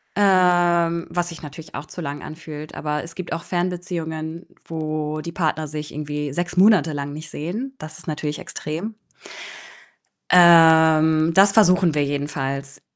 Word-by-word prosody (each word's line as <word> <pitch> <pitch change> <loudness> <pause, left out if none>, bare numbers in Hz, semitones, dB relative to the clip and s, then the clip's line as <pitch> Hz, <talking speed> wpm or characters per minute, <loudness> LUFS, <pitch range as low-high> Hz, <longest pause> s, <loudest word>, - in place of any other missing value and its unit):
ähm, 175 -3 +3
was 175 0 -2
sich 170 - -10
natürlich 155 +1 -10
auch 150 - -7
zu 180 - -8
lang 145 -2 -5
anfühlt. 155 -1 -9
Aber 150 -1 -2
es 165 0 -10
gibt 185 -2 -5
auch 165 - -4
Fernbeziehungen, 170 -2 -4 0.2
wo 155 -1 -3
die 170 - -6
Partner 160 -2 -1
sich 150 0 -6
irgendwie 150 -1 -4
6 175 +2 -3
Monate 185 -5 +4
lang 145 0 -4
nicht 155 +1 -8
sehen. 220 - -5
Das 155 0 -8
ist - - -12
natürlich 150 -1 -3
extrem. 170 +3 -6 1.4
Ähm, 160 -2 +6
das 195 +2 +6
versuchen 185 -5 +4
wir 145 - +2
jedenfalls. 140 -1 -4
160 Hz, 150 wpm, -22 LUFS, 150-175 Hz, 1.4 s, Ähm